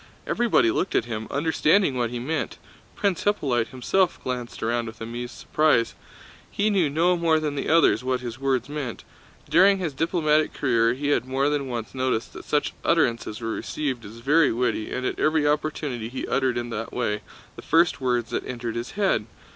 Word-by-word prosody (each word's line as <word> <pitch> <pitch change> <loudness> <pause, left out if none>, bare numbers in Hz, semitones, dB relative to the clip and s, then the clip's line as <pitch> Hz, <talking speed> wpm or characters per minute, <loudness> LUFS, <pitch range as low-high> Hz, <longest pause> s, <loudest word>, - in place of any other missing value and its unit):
Everybody 240 +9 +3
looked 190 - -1
at - - +2
him, 110 -2 -5
understanding 160 +2 +2
what 120 -2 0
he 120 - -4
meant. 155 +7 -3 0.4
Prince 200 -4 0
Hippolyte 135 - +1
himself 175 +9 0
glanced 125 -3 -4
around 115 +1 0
with 110 0 -9
amused 120 +2 -6
surprise. 150 -7 +2 0.6
He 210 +1 +1
knew 185 -7 +2
no 170 +5 +2
more 165 -2 +2
than 150 -2 -2
the 140 - -3
others 165 -5 +4
what 130 0 0
his 120 0 -7
words 135 -2 0
meant. 145 -7 -5 0.4
During 195 +2 +5
his 170 -6 -3
diplomatic 155 0 +1
career 115 -3 +2
he 145 +2 -2
had 145 - +2
more 135 +2 +1
than 145 -2 -1
once 120 -3 -5
noticed 130 -3 -1
that - - -10
such 150 - 0
utterances 120 -8 +1
were 115 0 -2
received 130 -1 -3
as 110 +3 -11
very 145 +3 +4
witty, 120 -2 -1
and 130 - -3
at - - -2
every 155 -1 +2
opportunity 145 -6 -1
he 130 - -4
uttered 130 -2 +1
in 120 0 -3
that 115 0 -4
way 105 -4 -1 0.3
the - - -9
first 170 -2 +2
words 120 -2 0
that - - -1
entered 120 -2 -4
his 120 +1 -4
head. 195 - +1
130 Hz, 185 wpm, -25 LUFS, 120-155 Hz, 0.6 s, During